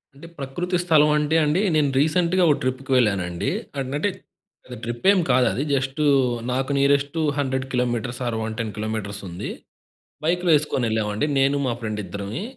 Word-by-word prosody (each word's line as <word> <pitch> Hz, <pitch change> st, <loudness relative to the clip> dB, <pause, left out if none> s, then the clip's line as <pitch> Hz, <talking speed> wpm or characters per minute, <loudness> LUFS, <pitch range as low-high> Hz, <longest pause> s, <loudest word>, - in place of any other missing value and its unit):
అంటే 150 Hz, +4 st, -12 dB
ప్రకృతి 175 Hz, +7 st, -2 dB
స్థలం 155 Hz, -3 st, +4 dB
అంటే 150 Hz, +2 st, +1 dB
అండి, 155 Hz, +6 st, +1 dB
నేను 150 Hz, -2 st, +3 dB
రీసెంట్‌గా 170 Hz, +4 st, +2 dB
ఒక 145 Hz, -, +5 dB
ట్రిప్‌కి 130 Hz, +1 st, -3 dB
వెళ్ళానండి. 95 Hz, -7 st, 0 dB, 0.4 s
అంటే 150 Hz, +8 st, 0 dB, 0.6 s
అది 125 Hz, -, -8 dB
ట్రిప్పేమి 175 Hz, -, +2 dB
కాదు 125 Hz, -1 st, +4 dB
అది 135 Hz, -, -1 dB
జస్ట్ 135 Hz, +2 st, -1 dB, 0.5 s
నాకు 130 Hz, +2 st, -1 dB
నియరెస్ట్ 140 Hz, +2 st, +2 dB, 0.2 s
100 130 Hz, -2 st, -1 dB
కిలోమీటర్స్ 120 Hz, -1 st, -1 dB
ఆర్ 115 Hz, -, -1 dB
110 110 Hz, 0 st, -3 dB
కిలోమీటర్స్ 105 Hz, -2 st, -4 dB
ఉంది. 85 Hz, 0 st, -6 dB, 0.8 s
బైక్‌లు 175 Hz, +1 st, +1 dB
ఎసుకొని 140 Hz, -4 st, -2 dB
ఎళ్ళామండి. 110 Hz, +3 st, 0 dB
నేను 135 Hz, +1 st, +3 dB
మా 125 Hz, -, 0 dB
ఫ్రెండ్ 110 Hz, -2 st, -3 dB
ఇద్దరమి. 100 Hz, -, -5 dB
130 Hz, 150 wpm, -23 LUFS, 110-150 Hz, 0.8 s, ఒక